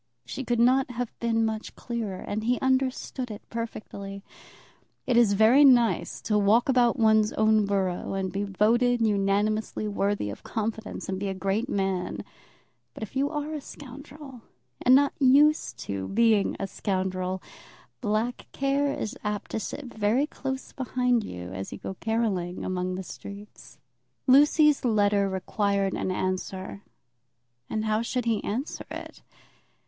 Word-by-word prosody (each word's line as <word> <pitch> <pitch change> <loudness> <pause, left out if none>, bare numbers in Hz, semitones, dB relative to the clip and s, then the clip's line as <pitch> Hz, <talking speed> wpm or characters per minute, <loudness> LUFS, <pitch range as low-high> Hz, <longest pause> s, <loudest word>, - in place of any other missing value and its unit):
She 270 - -5
could 240 -2 0
not 255 +2 +4
have 245 -1 -4
been 225 -1 +1
much 220 0 -4
clearer, 225 -6 -4
and 215 +1 -3
he 245 +1 +1
understood 260 -1 0
it 210 -1 -9
perfectly. 200 -4 -6 0.8
It 250 - +1
is 235 -4 +5
very 220 +8 +6
nice 245 -4 +3
to 210 -1 +2
walk 215 +4 +4
about 250 -2 +3
one's 220 -2 +4
own 215 -1 +3
borough 195 -2 -1
and 190 -1 -2
be 200 +2 -2
voted 230 +5 +2
unanimously 210 +1 0
worthy 200 - -1
of 100 - -9
confidence, 220 0 -4
and 190 0 -3
be 200 - -2
a 190 - -3
great 195 +6 -1
man; 190 -2 -1 0.7
but - - -6
if 220 - -8
you 275 +2 +1
are 300 0 -3
a 300 - -4
scoundrel, 275 -1 -11 0.4
and 255 - +6
not 280 +1 +4
used 275 - +4
to 95 -1 -3
being 220 -2 +2
a - - -1
scoundrel, 185 -2 -2 0.6
black 225 +2 -1
care 275 +1 +1
is 215 - -4
apt 210 -1 -3
to - - -1
sit 275 +7 -6
very 225 +3 +1
close 270 -3 -5
behind 250 -2 0
you 90 - -7
as 95 +1 -6
you - - -6
go - - -6
caracoling 210 -6 -1
along 185 0 -2
the 190 - -5
streets. 200 +3 -11 0.5
Lucy's 295 +2 +5
letter 205 -4 +2
required 195 +1 0
an - - -2
answer, 185 +1 -3 0.9
and 215 0 -2
how 215 0 +1
should 245 +1 -2
he 225 -3 0
answer 250 +9 -4
it? - - -8
220 Hz, 150 wpm, -27 LUFS, 195-250 Hz, 0.9 s, very